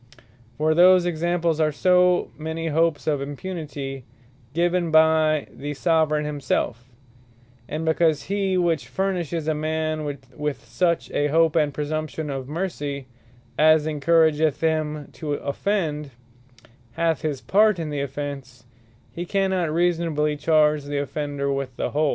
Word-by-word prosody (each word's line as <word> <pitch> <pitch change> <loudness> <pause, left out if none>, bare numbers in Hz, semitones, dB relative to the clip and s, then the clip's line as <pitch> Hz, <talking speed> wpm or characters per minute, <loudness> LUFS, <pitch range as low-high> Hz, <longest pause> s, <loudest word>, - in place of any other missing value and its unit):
For 155 +1 +2
those 180 +2 +6
Examples, 170 -1 0
are 155 -1 +2
so 180 +3 +3
many 160 +1 -4
hopes 160 -1 +1
of 145 -3 0
Impunity 140 -3 -6 0.5
given 175 +2 +1
by 160 -1 +4
the 145 +1 -6
Soveraign 155 -1 +1
himselfe: 130 -4 -2 0.8
And 155 +1 -3
because 160 -2 +2
he 195 -1 0
which 170 -4 0
furnishes 175 -5 -2
a 155 - +2
man 155 0 -2
with 140 0 -5
such 165 +10 0
a 145 - +1
hope, 160 +1 +3
and 150 -3 +2
presumption 155 +1 -3
of 135 -1 -5
mercy, 145 -5 -4 0.5
as 155 0 +5
encourageth 155 -1 +2
him 155 -2 -1
to 150 -2 -4
offend, 150 -1 -2 0.8
hath 165 -3 0
his 150 -4 -2
part 210 +4 +3
in 160 -3 -4
the 145 -1 -2
offence; 135 -3 -6 0.5
he 170 - -5
cannot 190 -3 0
reasonably 165 -3 +1
charge 150 -1 +2
the 145 0 -3
offender 140 -1 -2
with 135 -2 -4
the - - -2
whole. 150 0 +1
155 Hz, 135 wpm, -23 LUFS, 145-170 Hz, 0.8 s, those